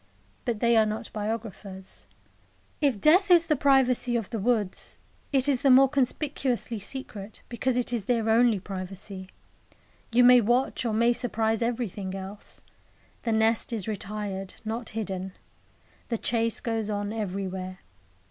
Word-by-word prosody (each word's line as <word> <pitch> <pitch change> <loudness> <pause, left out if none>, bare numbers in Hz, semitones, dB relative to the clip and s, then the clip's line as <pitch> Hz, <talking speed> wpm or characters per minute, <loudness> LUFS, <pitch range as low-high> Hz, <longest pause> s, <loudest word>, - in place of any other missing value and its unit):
But 235 -4 -2
they 235 0 +4
are 220 - +5
not 220 +2 -5
biographers. 210 -3 -6 0.7
If 275 -8 +2
death 365 - +5
is 345 -2 +6
the 310 - +2
privacy 260 -3 +3
of 225 -3 -2
the 225 - -2
woods, 210 -3 0 0.3
it 270 -1 +2
is 270 -4 +2
the 275 - +4
more 265 +1 +8
conspicuously 265 -3 -1
secret 210 -2 -7
because 245 +1 0
it 245 0 -1
is 225 -5 -2
their 230 -2 +1
only 225 -1 +4
privacy. 190 0 -7 0.8
You 245 +2 +5
may 250 0 +8
watch 245 +3 +1
or 225 - 0
may 235 +2 +4
surprise 225 -2 0
everything 220 -5 -2
else. 195 +2 -8 0.6
The 230 - +1
nest 220 +1 +2
is 220 -4 -3
retired, 205 -2 -4
not 225 +1 -4
hidden. 190 -3 -4 0.8
The 230 - 0
chase 230 0 0
goes 225 -2 -2
on 205 0 -2
everywhere. 190 -3 -4
225 Hz, 145 wpm, -27 LUFS, 205-245 Hz, 0.8 s, more